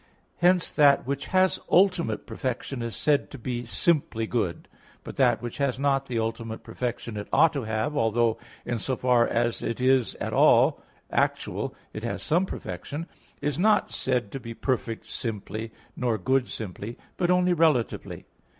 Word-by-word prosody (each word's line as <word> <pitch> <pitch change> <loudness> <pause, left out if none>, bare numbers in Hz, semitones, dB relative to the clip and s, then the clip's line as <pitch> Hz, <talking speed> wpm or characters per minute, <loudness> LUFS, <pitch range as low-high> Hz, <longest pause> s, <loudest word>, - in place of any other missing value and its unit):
Hence 180 0 +3
that 140 -2 +5
which 140 0 -3
has 185 0 +3
ultimate 180 -2 +3
perfection 130 -1 -4
is 115 -3 -4
said 150 -2 +1
to - - -9
be 120 -1 -4
simply 140 -6 +1
good; 110 -7 -2 0.4
but - - -8
that - - +3
which 120 - -6
has 140 -3 +1
not 135 0 +1
the 120 - -2
ultimate 115 0 -3
perfection 120 -1 -4
it 105 - -5
ought 165 - +5
to 140 -5 -3
have 110 +6 -1
(although, 115 -2 +2 0.3
in 120 -2 -2
so 130 +4 -1
far 125 -1 +3
as 120 0 0
it 115 - -3
is 130 -1 +3
at - - -4
all - - +5 0.3
actual, - - -1 0.2
it - - -6
has - - -3
some 175 +5 +2
perfection), 140 - -6 0.4
is 145 +2 -1
not 215 +3 +3
said 125 -6 -1
to 135 - -5
be 115 -2 -8
perfect 120 -4 -2
simply 110 0 -5 0.2
nor 120 -3 0
good 130 +2 +1
simply, 105 +2 -6 0.2
but 175 - 0
only 180 0 +4
relatively. 155 -8 +1
125 Hz, 165 wpm, -26 LUFS, 115-145 Hz, 0.4 s, that